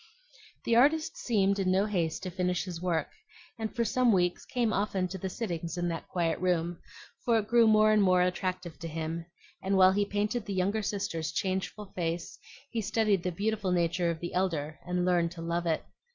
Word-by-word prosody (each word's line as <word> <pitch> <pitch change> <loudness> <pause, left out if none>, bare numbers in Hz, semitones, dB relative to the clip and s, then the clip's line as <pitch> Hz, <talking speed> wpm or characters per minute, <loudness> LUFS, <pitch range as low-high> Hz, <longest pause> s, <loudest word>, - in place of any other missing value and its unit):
The 230 - +2
artist 300 +6 +3
seemed 200 -4 +1
in 190 -1 +1
no 190 +2 +3
haste 170 -6 -1
to 185 - -4
finish 180 0 0
his 175 -3 -6
work, 175 -3 0 0.5
and 220 -1 -2
for 235 -1 +1
some 250 +2 +3
weeks 180 -3 +1
came 240 -3 0
often 195 -2 0
to 190 +1 -6
the 190 - -3
sittings 170 -5 -4
in 175 0 0
that 165 -1 -5
quiet 170 -3 -1
room; 175 -1 0 0.4
for 235 -2 +3
it 210 -2 -1
grew 235 0 +5
more 215 0 +5
and 215 -1 +4
more 185 -2 +4
attractive 180 -3 -2
to 165 - -5
him, 165 +1 -4 0.3
and 195 +1 +1
while 185 0 +7
he 205 +2 +2
painted 205 +3 -2
the 200 - -3
younger 200 +4 +1
sister's 190 -6 -2
changeful 190 +2 -3
face 170 -1 -3 0.3
he 230 - -1
studied 210 -2 +1
the 180 - -2
beautiful 205 +1 -1
nature 175 0 +1
of 165 -1 -3
the 175 - -5
elder 160 -5 -1
and 180 0 0
learned 175 -2 +2
to 165 -2 -8
love 170 +1 -1
it. 160 -1 0
185 Hz, 200 wpm, -29 LUFS, 170-210 Hz, 0.5 s, while